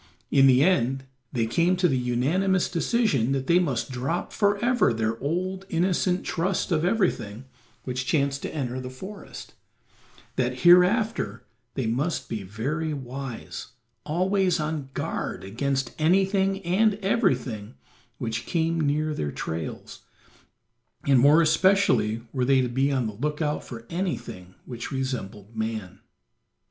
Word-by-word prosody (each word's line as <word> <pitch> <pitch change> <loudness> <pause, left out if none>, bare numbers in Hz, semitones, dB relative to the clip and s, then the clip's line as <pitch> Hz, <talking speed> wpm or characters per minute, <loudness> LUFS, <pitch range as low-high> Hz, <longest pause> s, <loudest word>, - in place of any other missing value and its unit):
In 135 -1 +6
the 130 +1 +6
end 135 -7 +2 0.3
they 115 -2 0
came 170 +10 +2
to 180 0 +3
the 135 - +1
unanimous 145 +10 +1
decision 165 - +1
that 135 -1 -1
they 170 +5 +4
must 140 -7 -1
drop 130 +8 -3
forever 210 - +2
their 115 0 -1
old, 185 +6 -2
innocent 180 +1 +1
trust 185 +3 -1
of 160 -2 +2
everything 170 - 0 0.4
which 125 0 -3
chanced 140 -1 +1
to - - -4
enter 130 -4 -3
the 130 0 -6
forest; 190 +11 -10 0.8
that 125 0 -1
hereafter 180 - +4 0.3
they 130 - -1
must 135 +10 -1
be 110 -3 -3
very 140 - -3
wise, 130 -3 -7 0.3
always 185 +2 +1
on 150 -3 -3
guard - - -3
against 130 +5 -2
anything 195 +3 +2
and 200 +5 +3
everything 125 - 0 0.4
which 115 -1 -4
came 165 -1 0
near 150 +1 +1
their 75 - -3
trails, 80 +1 -5 1.1
and 135 -2 +5
more 150 +6 +6
especially 155 - +3
were 130 -2 0
they 135 +1 +4
to 125 - -1
be 135 +3 +1
on 130 -3 0
the 110 - -3
lookout 150 +5 -2
for 115 -2 -9
anything 125 - -4
which 120 +1 -6
resembled 115 -6 -4
man. 110 -4 -4
140 Hz, 135 wpm, -26 LUFS, 120-180 Hz, 1.1 s, In